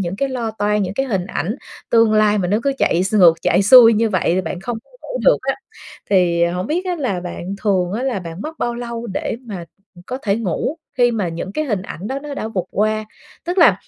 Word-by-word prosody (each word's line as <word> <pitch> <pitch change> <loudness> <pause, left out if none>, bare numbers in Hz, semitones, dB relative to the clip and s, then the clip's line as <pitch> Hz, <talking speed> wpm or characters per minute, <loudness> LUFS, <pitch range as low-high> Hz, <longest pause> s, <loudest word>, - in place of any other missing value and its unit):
những 180 0 -3
cái 275 +5 0
lo 240 -4 -3
toan, 210 -1 0
những 185 +1 -3
cái 270 +3 -1
hình 195 -6 -1
ảnh 200 - -3 0.3
tương 230 -2 +4
lai 210 -1 +4
mà 180 - 0
nó 210 +3 +2
cứ 280 - +1
chạy 175 - +2
x 200 - -2
ngược 175 -5 +7
chạy - - +3
xuôi 230 +2 +9
như 225 +1 +2
vậy 185 -4 0
thì 185 - +2
bạn 175 +1 -5
không 225 +3 -4
có - - -31
ngủ - - -5
được - - +5
á, 270 0 0 0.6
thì 175 -3 +3
hổng 180 +2 -2
biết 350 +5 -1
á 355 -1 -1
là 235 - -2
bạn 180 +2 -6
thường 190 -3 +1
á 235 +4 -2
là 255 -7 -1
bạn 170 +2 -7
mất 315 +1 -7
bao 240 0 -1
lâu 235 -1 -5
để 195 +2 -3
mà, 185 -6 -6 0.3
ừ, 175 - -15
có 255 +1 -4
thể 200 -1 +1
ngủ, 230 - -2 0.2
khi 245 0 +5
mà 205 -6 -1
những 170 +4 -5
cái 310 - -1
hình 210 -8 -1
ảnh 195 0 -7
đó 270 +3 -3
nó 290 0 -7
đã 220 - -4
vụt 185 -5 -3
qua? 215 +1 0 0.4
Tức 355 +2 -2
là 335 - +6
215 Hz, 255 wpm, -19 LUFS, 185-245 Hz, 0.6 s, xuôi